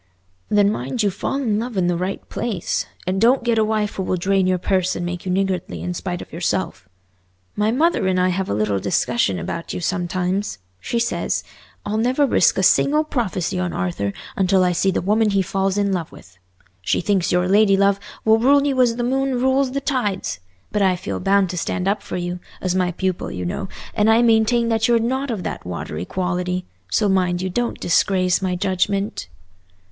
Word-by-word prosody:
"Then 205 -1 +4
mind 175 - -2
you 200 - +2
fall 200 - -3
in 230 -7 0
love 235 -2 -4
in 185 - +2
the 175 0 +1
right 185 +3 -4
place, 215 -7 -2 0.2
and 185 +2 -1
don't 245 +2 +4
get 235 -2 +2
a - - +4
wife 215 -1 -1
who - - -1
will 185 0 -1
drain 190 +1 +1
your 185 0 +2
purse 185 0 0
and 175 - -3
make 180 +1 -5
you - - 0
niggardly 190 -1 -1
in 180 - -2
spite 180 0 -4
of - - -18
yourself. 95 - -2 0.7
My 210 +1 +1
mother 290 - +2
and 185 -1 +1
I 180 0 +3
have 185 +1 -2
a - - 0
little 105 -2 0
discussion 100 +1 0
about 125 - -5
you - - -3
sometimes: 185 - -1 0.2
she 235 - -3
says, 235 0 -1 0.4
'I'll 215 +1 -1
never 255 +5 +2
risk - - +3
a - - +1
single 300 +2 +4
prophecy 190 - -2
on 180 -1 -2
Arthur 90 +3 -2 0.2
until 190 -1 +3
I 180 - +3
see 180 +3 +1
the 185 - -1
woman 215 +3 +2
he 195 -1 +2
falls 195 +1 -1
in 200 -1 +1
love 170 -4 -3
with.' 95 - -15 0.5
She 95 - 0
thinks 190 -1 +1
your 180 0 +2
lady 200 0 +4
love 200 0 +3 0.3
will 220 0 +5
rule 280 +4 +4
you 270 -3 +2
as 240 -2 +3
the 240 - -2
moon 270 +1 0
rules 265 +1 +2
the 275 - -1
tides. 210 - -2 0.3
But 210 - 0
I 190 -2 +3
feel 180 - -4
bound 195 -1 +2
to 180 - -3
stand 180 +2 -2
up 200 +1 +1
for - - -5
you, 175 0 -3 0.2
as 185 -1 -1
my 180 -1 +1
pupil 185 0 -2
you 90 0 -5
know, 90 - -3 0.2
and 215 0 +2
I 225 +2 +5
maintain 230 +1 +3
that 225 0 +2
you're 240 -1 +4
not 260 +4 -1
of 215 -6 -3
that - - -5
watery 90 -2 -5
quality. 180 - -2 0.2
So 205 - +2
mind 180 -2 +1
you 185 - -2
don't 240 +5 -2
disgrace 185 +1 +2
my 185 -1 -1
judgment." 195 - -1
195 Hz, 210 wpm, -21 LUFS, 180-220 Hz, 0.7 s, will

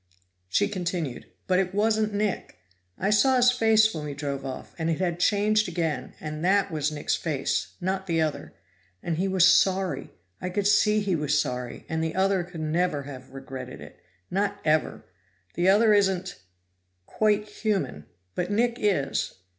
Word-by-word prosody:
She - - +2
continued. 175 -8 -4 0.2
"But 185 0 +2
it 190 0 -1
wasn't 215 0 +2
Nick! 205 -1 -2 0.4
I 195 +3 0
saw 235 +6 +4
his 250 0 +5
face 220 -2 +4
when 155 - -5
we 145 -1 -5
drove 140 -1 -4
off, 135 -1 -7
and 165 0 0
it 165 - -1
had 175 -2 -1
changed 215 +3 +2
again, 165 -3 -3
and 155 0 -6
that 195 +1 +2
was 150 -1 -1
Nick's 150 -1 -2
face, 145 -5 -2
not 190 +1 -2
the 165 -2 +1
other. 155 -2 -2 0.5
And 165 -2 -2
he 190 +3 0
was 190 -2 +4
sorry; 190 +1 +3 0.3
I 180 - -2
could 200 +2 -2
see 210 +1 +4
he 195 -3 0
was 150 -1 +1
sorry, 125 -3 -4
and 160 0 -2
the 160 - -3
other 190 -1 +2
could 175 -2 -8
never 155 -1 0
have 130 -2 -10
regretted 135 -1 -8
it - - -13 0.3
not 200 +2 -1
ever! 155 0 +1 0.5
The 175 +2 +2
other 215 +2 +5
isn't 190 -2 +1 0.6
quite 210 - +1
human, 205 - -2 0.3
but 180 0 -2
Nick 235 +3 +1
is." 185 -10 0
180 Hz, 170 wpm, -26 LUFS, 155-205 Hz, 0.6 s, his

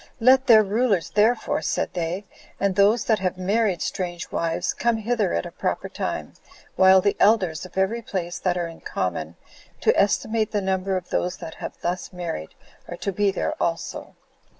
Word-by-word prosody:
"Let 260 +3 +5
their 220 -3 +8
rulers, 200 -5 +1
therefore, 215 +6 +2
[said - - -1
they,] 175 +3 -3 0.3
and 195 -2 +1
those 205 +3 +4
that 220 -2 +2
have 185 -1 -1
married 195 -1 +1
strange 175 -2 -4
wives, 165 0 -1
come 235 -1 +1
hither 225 +1 0
at 85 - -1
a - - -7
proper - - -2
time, - - -4 0.4
while 190 0 +6
the 200 +1 +1
elders 185 -6 +3
of 185 - -17
every 200 +5 +1
place, 180 -5 -4
that 180 -1 0
are 175 - -1
in 165 - -12
common 85 -3 -3 0.5
to - - +3
estimate 215 +2 +1
the 210 - +2
number 190 0 0
of 180 - -7
those 180 +1 -1
that 165 -2 -8
have - - -8
thus 175 +2 -3
married, 170 - -5 0.3
are - - -7
to 200 - -2
be 205 +1 +1
there 195 - -1
also." 165 -1 -3
190 Hz, 180 wpm, -24 LUFS, 175-215 Hz, 0.5 s, their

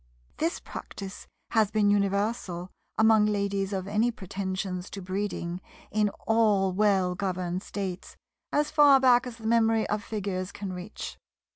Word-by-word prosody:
This 330 +3 0
practice 195 0 -8 0.2
has 220 -3 +3
been 210 -1 +3
universal 200 -3 0 0.3
among 220 -1 +5
ladies 200 -1 0
of 190 -1 -3
any 215 +4 +2
pretensions 190 -3 -4
to 200 - -7
breeding 185 -2 -3 0.3
in 210 0 +2 0.2
all 210 -4 +3
well 190 -2 +3
governed 185 -1 -2
States, 190 -3 -5 0.3
as 295 0 +1
far 290 -3 +7
back 250 -1 +5
as 235 -2 -8
the 225 - -11
memory 225 -1 +3
of 210 0 -1
Figures 195 -3 -3
can 195 -2 -5
reach. 180 +3 -7
205 Hz, 140 wpm, -28 LUFS, 190-220 Hz, 0.3 s, far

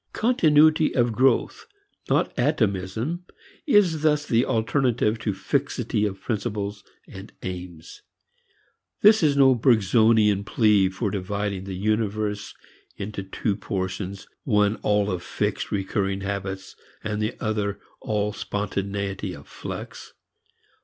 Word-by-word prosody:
Continuity 155 -9 +4
of 120 -2 +2
growth 130 +4 +1 0.4
not - - +1
atomism 120 - -1 0.4
is 190 - +4
thus 150 -1 +2
the 115 -2 +2
alternative 115 -2 +1
to 110 - -1
fixity 105 +2 -1
of 95 -1 -6
principles 105 -2 -3 0.2
and - - -10
aims. 90 -3 -7 1.0
This 215 +1 +7
is 145 -3 +3
no 135 -1 +6
Bergsonian 110 -3 +4
plea 105 -3 +3
for 95 +2 -3
dividing 100 0 -3
the 95 -1 -5
universe 105 0 -1 0.4
into 100 0 -5
two 100 +2 -2
portions, 95 -1 -4 0.2
one 105 -3 +2
all 105 0 +1
of 90 -2 -3
fixed, 90 - -3
recurrent 95 0 -1
habits, 95 -1 -4 0.3
and 105 -1 -2
the 105 +3 -1
other 105 -2 -2 0.2
all 105 -1 -1
spontaneity 100 -2 -3
of - - -14
flux. - - -8
105 Hz, 115 wpm, -24 LUFS, 100-120 Hz, 1.0 s, This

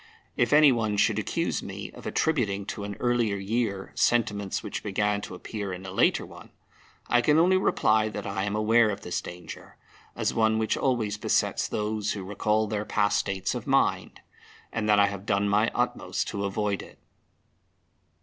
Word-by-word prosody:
If 120 - +1
any 150 -1 +7
one 110 -4 0
should - - +2
accuse - - -1
me - - -7
of - - -10
attributing 105 -11 0
to 100 +1 -5
an 100 0 -5
earlier 120 -4 +1
year 100 0 -2
sentiments 105 -4 0
which - - -5
began 105 0 0
to 90 - -7
appear 100 +1 -5
in 90 +1 -7
a 95 - -6
later 95 - +2
one, - - -13 0.6
I 120 - +3
can 150 +5 +3
only 180 +3 +5
reply 110 - +2
that 105 -1 -6
I 100 -1 -2
am 100 +1 -2
aware 110 +1 +4
of 100 0 -4
this 90 - -3
danger, 90 0 -10 0.4
as - - -1
one 110 -1 +2
which 110 -1 0
always 110 -6 0
besets - - +1
those 105 0 -2
who 100 - -6
recall 105 +3 0
their 105 -1 -2
past 105 -1 +1
states 95 -1 -2
of - - -6
mind, - - +1 0.5
and 110 -2 -1
that 105 - +5
I 100 - +6
have 100 0 -5
done 100 -1 +1
my 105 +2 +3
utmost - - -1
to 100 0 -3
avoid 100 0 -1
it. - - -14
105 Hz, 180 wpm, -27 LUFS, 100-110 Hz, 0.6 s, any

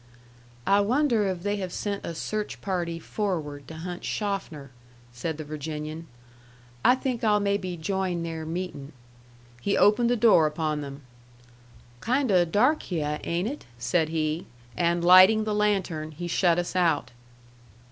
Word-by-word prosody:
"I 200 +1 +4
wonder 230 0 +2
if 180 -2 -3
they 205 0 0
have 185 -3 -4
sent 200 +2 -3
a 170 - -5
search 210 +5 -4
party 175 -3 -2
forward 160 -7 -4
to 160 - -9
hunt 175 +2 -6
Schoffner?" 185 - -3 0.4
said 150 +6 -4
the 155 - -5
Virginian. 155 +2 -6 0.8
"I 250 - +6
think 255 -2 -3
I'll 210 -2 +4
maybe 200 -3 -1
join 180 0 -2
their 165 -1 -4
meeting." 160 -3 -5 0.7
He 200 - 0
opened 235 +3 +4
the 245 - +3
door 215 -9 +5
upon 155 -1 -2
them. 140 0 -8 1.0
"Kind 255 - +1
o' 180 -2 +5
dark 245 - +2
hyeh, 150 -4 -2
ain't 175 +4 -1
it?" 285 +5 -6
said 155 +6 +1
he. 155 +1 -2 0.3
And 170 +4 +1
lighting 185 +5 +8
the 215 -1 -2
lantern, 190 -7 0
he 175 +3 -5
shut 175 0 +2
us 175 +1 -2
out. 170 -5 +1
175 Hz, 150 wpm, -26 LUFS, 160-205 Hz, 1.0 s, lighting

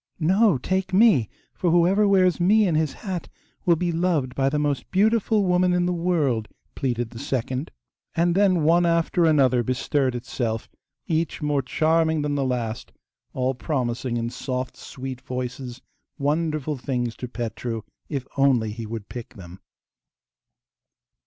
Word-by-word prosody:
'No, 190 +1 +4
take 185 +7 -1
me, 190 - +5 0.2
for 180 - 0
whoever 180 +5 +4
wears 185 -3 +3
me 210 +5 +4
in 170 - +1
his 155 -2 +1
hat 185 -4 -4 0.4
will 170 - +6
be 175 +1 -1
loved 165 -6 0
by 135 0 +1
the 150 - -1
most 145 -2 -1
beautiful 215 +1 +2
woman 180 0 +3
in 180 0 +2
the 180 - 0
world,' 155 -11 0 0.3
pleaded 120 -3 -2
the 115 - -9
second; 130 0 -2 0.5
and 170 +1 +2
then 185 -3 +3
one 170 +3 +4
after 170 0 +2
another 135 -6 +4
bestirred 130 +2 0
itself, 120 -2 -3 0.4
each 160 -1 -1
more 145 -2 +1
charming 160 +3 +1
than 145 0 -1
the 140 -1 0
last, 120 -3 -3 0.4
all 130 0 0
promising, 125 -3 -2
in 115 0 -2
soft 130 0 -4
sweet 130 -1 -7
voices, 125 0 -5 0.3
wonderful 150 0 -1
things 120 -3 -2
to 125 - -5
Petru, 115 -1 -4 0.3
if 140 -4 -3
only 130 -6 +3
he 115 0 -6
would 110 -2 -6
pick 120 -2 -8
them. 90 -1 -11
145 Hz, 150 wpm, -24 LUFS, 125-175 Hz, 0.5 s, will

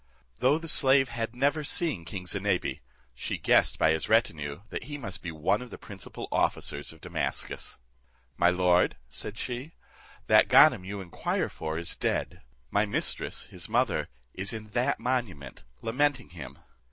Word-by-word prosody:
Though 135 +4 +4
the 165 +1 -7
slave 135 -3 +4
had 115 0 -3
never 145 +4 +1
seen 145 - +1
king 90 +2 -6
Zinebi, - - -1 0.3
she - - -3
guessed - - +3
by 80 - +4
his 80 0 -1
retinue 80 -7 +1
that - - -4
he 145 +1 -5
must 100 -9 -5
be 85 - -5
one 85 +7 +1
of 125 - -8
the - - -8
principal 100 -3 -8
officers 70 0 0
of 80 - -14
Damascus. - - -3 0.6
"My 85 +5 +4
lord," 90 0 +3
said 105 - -7
she, 125 +7 -5 0.5
"that - - +6
Ganem - - +7
you 100 +1 -5
inquire 90 -3 -2
for 80 0 -4
is 85 0 -1
dead; - - -2 0.3
my 100 - +3
mistress, 100 - -1
his - - -6
mother, - - +1 0.2
is 95 +3 -3
in 110 -1 -7
that 125 +5 0
monument, 115 - -3 0.2
lamenting 130 +2 +1
him." 85 -2 -9
105 Hz, 160 wpm, -28 LUFS, 85-130 Hz, 0.6 s, Ganem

